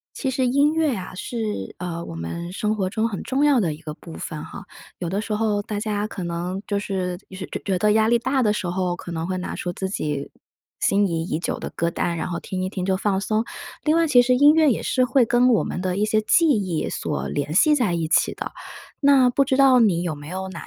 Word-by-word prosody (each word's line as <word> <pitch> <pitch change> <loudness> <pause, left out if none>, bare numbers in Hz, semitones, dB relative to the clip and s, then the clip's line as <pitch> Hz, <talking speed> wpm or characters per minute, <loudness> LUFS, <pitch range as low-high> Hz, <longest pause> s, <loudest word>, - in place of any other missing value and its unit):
其 265 - -2
实 260 0 0
音 280 +4 +3
乐 315 -6 +1
啊， 185 -1 -7
是， 210 - -4
呃， 170 -1 -4
我 - - -8
们 170 - -5
生 210 +2 -1
活 190 -3 -1
中 220 +2 0
很 200 -4 -5
重 270 +2 0
要 285 -4 +4
的 170 -7 0
一 150 - -13
个 155 -2 -7
部 165 +1 -12
分 155 -2 -6
哈， 200 - -9 0.3
有 175 - -3
的 195 +4 -1
时 215 - -5
候 210 -1 0
大 205 0 -4
家 210 -1 -1
可 190 -4 -6
能 175 +2 -3
就 205 - -1
是 185 -3 -3
就 190 - -9
是 190 - -6
觉 - - -6
觉 190 -2 0
得 210 +3 +3
压 220 +1 +3
力 235 +1 +4
大 265 +2 0
的 210 -3 +3
时 210 - -3
候， 180 0 -1
可 175 - -8
能 165 0 -3
会 185 0 -2
拿 180 - -4
出 175 - -4
自 190 +2 -4
己 150 -7 -3 0.5
心 200 +1 +3
仪 165 -3 -1
已 165 -2 -2
久 170 - -3
的 - - -5
歌 170 - -1
单， 170 0 -1
然 - - -3
后 170 -1 -4
听 185 -1 -4
一 - - -1
听， 185 -1 -4
就 190 0 +1
放 195 0 0
松。 215 +3 0 0.4
另 305 - +3
外 330 -1 +3
其 255 -4 +6
实 250 +1 +3
音 290 +4 +6
乐 315 -2 +5
也 - - -3
是 255 - +2
会 255 0 +3
跟 240 +2 +3
我 225 - +3
们 - - -4
的 185 -1 -1
一 205 - +1
些 215 0 +2
记 330 +9 +4
忆 195 - 0
所 150 - -3
联 145 +1 -3
系 300 - +5
在 220 -10 +1
一 165 -2 -1
起 165 - +2
的。 - - -6 0.5
那 275 -3 +5
不 275 +3 +2
知 265 -1 +1
道 270 -2 +6
你 195 -8 +3
有 165 -4 -3
没 145 0 -11
有 190 +2 -4
哪 180 -3 -8
200 Hz, 280 characters per minute, -23 LUFS, 175-245 Hz, 0.5 s, 其